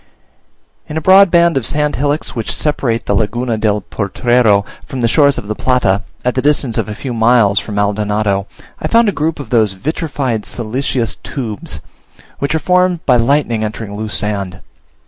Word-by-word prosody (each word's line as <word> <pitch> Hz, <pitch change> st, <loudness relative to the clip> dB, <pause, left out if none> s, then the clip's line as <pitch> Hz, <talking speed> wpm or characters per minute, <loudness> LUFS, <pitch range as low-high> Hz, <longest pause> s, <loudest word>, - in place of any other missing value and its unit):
In 155 Hz, -, -5 dB
a -, -, -1 dB
broad 190 Hz, +4 st, +6 dB
band 170 Hz, -2 st, +4 dB
of 130 Hz, -, -1 dB
sand 150 Hz, -2 st, -1 dB
hillocks 145 Hz, +3 st, -1 dB
which 115 Hz, -3 st, -3 dB
separate 125 Hz, -6 st, -1 dB
the -, -, 0 dB
Laguna 115 Hz, +4 st, 0 dB
del 105 Hz, -1 st, 0 dB
Potrero 105 Hz, +1 st, +1 dB, 0.2 s
from 135 Hz, -5 st, -5 dB
the 115 Hz, -, +3 dB
shores 140 Hz, +2 st, +3 dB
of 100 Hz, -, -6 dB
the 105 Hz, -, -1 dB
Plata, 105 Hz, -5 st, +1 dB, 0.2 s
at 125 Hz, -, +2 dB
the 130 Hz, -, 0 dB
distance 140 Hz, -5 st, +1 dB
of -, -, -2 dB
a 105 Hz, -, -5 dB
few 130 Hz, +1 st, -5 dB
miles 110 Hz, -3 st, +3 dB
from 105 Hz, -, -6 dB
Maldonado, 105 Hz, -1 st, 0 dB, 0.3 s
I -, -, -2 dB
found 230 Hz, -1 st, +4 dB
a 195 Hz, -, -5 dB
group 160 Hz, 0 st, 0 dB
of 135 Hz, -6 st, -8 dB
those 110 Hz, -5 st, +3 dB
vitrified, 130 Hz, -, -2 dB
siliceous 120 Hz, 0 st, -2 dB
tubes, 105 Hz, -, -5 dB, 0.6 s
which 140 Hz, +3 st, -1 dB
are -, -, +3 dB
formed 180 Hz, 0 st, +1 dB
by 125 Hz, -3 st, +4 dB
lightning 120 Hz, -2 st, +1 dB
entering 105 Hz, -1 st, -5 dB
loose 110 Hz, 0 st, -3 dB
sand. 100 Hz, -4 st, -3 dB
120 Hz, 180 wpm, -15 LUFS, 105-145 Hz, 0.6 s, broad